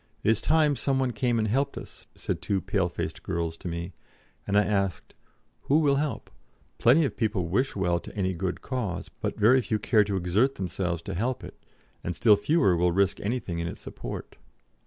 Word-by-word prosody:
"It 110 - +4
is 110 - +1
time 155 -2 +3
some 135 0 0
one 130 -2 +1
came 120 +1 0
and 110 -1 +1
helped 135 +6 0
us," - - -10
said - - -3
two 100 -2 0
pale 95 -1 0
faced 85 - -5
girls 85 -1 -2
to 95 - -8
me; 85 +1 -4 0.5
and 100 - +2
I 105 - +6
asked: 100 -4 -1 0.5
"Who 145 - +4
will 145 -3 +3
help? 150 0 -3 0.5
Plenty 145 +7 +5
of 125 - -3
people 105 -6 0
wish 130 +9 +1
well 90 -3 +1
to - - -11
any 95 -2 0
good 90 +1 -3
cause; 110 -9 -3
but - - -5
very 125 +5 +6
few 110 -2 -1
care 105 +1 +3
to 100 -1 -2
exert 100 +10 +2
themselves 90 -2 -2
to 95 - -5
help 120 +8 -2
it, - - -11 0.4
and 90 - -3
still 110 +1 +6
fewer 105 - +3
will 90 +1 +2
risk 95 +2 +1
anything 100 -6 -2
in 85 - -2
its - - -7
support. - - -7
100 Hz, 200 wpm, -27 LUFS, 90-125 Hz, 0.5 s, I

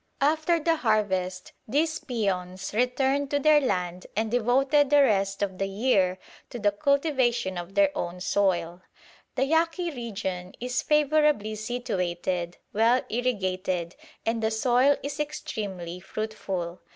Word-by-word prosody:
After 315 +4 +2
the 325 +1 +1
harvest 190 -7 0 0.2
these 310 +6 +1
peones 190 -7 -3
returned 265 +4 +1
to 285 - +1
their 300 +1 +5
land 180 -7 -2
and 220 +1 -1
devoted 265 +4 +3
the 290 0 +6
rest 195 -4 +1
of 190 -2 -3
the 195 - 0
year 195 -3 +1 0.3
to - - -6
the 205 -3 +2
cultivation 260 - +1
of 175 +2 -7
their 295 -1 +3
own 180 - -4
soil. 180 -3 0 0.5
"The 265 - +2
Yaqui 330 +3 +1
region 195 - -5
is 250 +1 -1
favourably 300 -7 +2
situated, 180 -6 -3 0.2
well 230 +4 +3
irrigated, 185 -7 -1 0.3
and 225 0 0
the 220 - +1
soil 250 +5 +3
is 285 +1 -5
extremely 200 - -4
fruitful. 190 -3 -4
220 Hz, 130 wpm, -26 LUFS, 185-280 Hz, 0.5 s, the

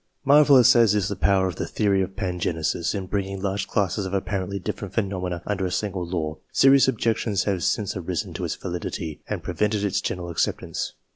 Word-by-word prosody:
Marvellous 140 -4 +7
as 115 -3 +5
is 100 -2 0
the 100 - -2
power 95 -1 +2
of 90 -4 -3
the - - -3
theory 100 -3 +1
of 95 0 -4
pangenesis 90 -3 -1
in 95 -2 -3
bringing 95 0 -3
large 100 0 -2
classes 100 +1 0
of 95 +1 -3
apparently 100 0 -2
different 100 +1 -5
phenomena 90 -5 -2
under 100 -2 -2
a 90 - 0
single 95 -3 -2
law, 80 -3 -3
serious 135 0 +5
objections 110 -5 0
have 95 -4 -1
since 105 -3 0
arisen 90 -2 -3
to - - -5
its - - -2
validity, 85 -3 -5
and - - -3
prevented 105 -1 0
its 100 -3 0
general 85 -1 -4
acceptance. 80 - -2
95 Hz, 190 wpm, -24 LUFS, 90-105 Hz, -, Marvellous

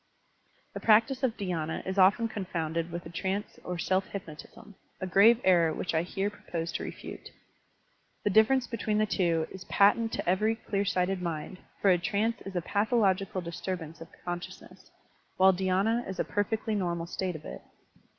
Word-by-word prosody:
The - - -5
practice 225 +4 +4
of 250 -4 0
dhydna 165 -6 -3
is 190 +1 -2
often 200 +5 +5
confounded 170 -6 -3
with 170 0 -6
a 165 - -8
trance 190 +4 -3
or 180 -1 -4
self 185 +2 0
hypnotism, 190 +2 -9
— - - -39
a - - -3
grave 205 +5 +6
error 170 -3 +4
which 170 - -3
I 160 - +3
here 195 +4 -2
propose 170 -4 -5
to - - -3
refute. - - -8 0.9
The 205 - +1
difference 235 +5 +4
between 220 -3 -2
the 215 - +3
two 170 -6 +1
is 190 -1 -9
patent 225 +3 +3
to - - -3
every 210 +5 +2
clear 200 -3 -2
sighted 185 -1 0
mind, 170 +2 -4 0.2
for 195 - +6
a 180 - +3
trance 210 +6 -1
is 195 - -7
a 175 - +1
pathological 200 -2 +1
disturbance 170 -1 -5
of 165 - -8 0.2
consciousness, 175 0 -7 0.5
while 190 0 +6
dhy^na 195 +6 +1
is 190 - -5
a - - +3
perfectly 220 +2 -1
normal 175 -4 -1
state 180 0 -3
of 155 - -9
it. - - -7
190 Hz, 175 wpm, -29 LUFS, 175-210 Hz, 0.9 s, grave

